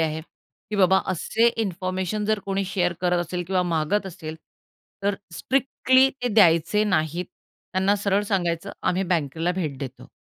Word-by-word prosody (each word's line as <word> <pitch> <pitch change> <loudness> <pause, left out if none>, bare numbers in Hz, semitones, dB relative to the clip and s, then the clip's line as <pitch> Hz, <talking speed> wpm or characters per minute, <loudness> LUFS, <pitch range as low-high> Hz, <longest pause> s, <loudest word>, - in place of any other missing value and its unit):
आहे 160 0 0 0.5
की 210 - -2
बाबा 190 0 +5
असे 220 +6 +1
इन्फॉर्मेशन 190 0 -2
जर 215 0 +1
कोणी 195 0 0
शेअर 180 -2 0
करत 180 -1 +2
असेल 175 +1 -3
किंवा 185 -1 +1
मागत 175 +4 0
असेल. 160 -3 -7 0.7
तर 200 0 +1 0.2
स्ट्रिक्टली 260 +1 +3
ते 245 - +1
द्यायचे 175 +1 +4
नाहीत 175 -2 0 0.5
त्यांना 190 +2 +2
सरळ 200 0 +1
सांगायचं 175 -5 -1
आम्ही 185 +2 +1
बँकेला 165 -1 0
भेट 155 -7 -3
देतो. 130 -1 -7
185 Hz, 145 wpm, -24 LUFS, 165-200 Hz, 0.7 s, बाबा